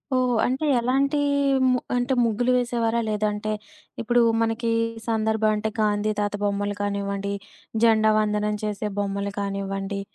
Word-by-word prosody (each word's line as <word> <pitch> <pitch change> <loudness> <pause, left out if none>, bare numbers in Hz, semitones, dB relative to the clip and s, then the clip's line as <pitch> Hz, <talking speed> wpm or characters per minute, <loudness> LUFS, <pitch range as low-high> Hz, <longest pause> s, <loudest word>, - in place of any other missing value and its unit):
ఓహ్! 250 -1 +2
అంటే 265 +5 -1
ఎలాంటీ 275 +4 +1 0.4
హ్మ్ 255 -1 +3 0.2
అంటే 245 +2 +1
ముగ్గులు 235 +2 +1
వేసేవారా? 235 -1 0
లేదంటే 210 0 -1 0.5
ఇప్పుడు 240 +1 +3 0.2
మనకి 230 +1 0 0.4
సందర్భమంటే 220 -1 +1
గాంధీ 210 0 +1
తాత 205 0 -1
బొమ్మలు 205 0 -1
కానివ్వండి, 200 0 -2 0.5
జెండా 220 -1 +5
వందనం 210 0 0
చేసే 210 0 -2
బొమ్మలు 200 0 -2
కానివ్వండి 195 0 -3
215 Hz, 120 wpm, -24 LUFS, 205-235 Hz, 0.5 s, జెండా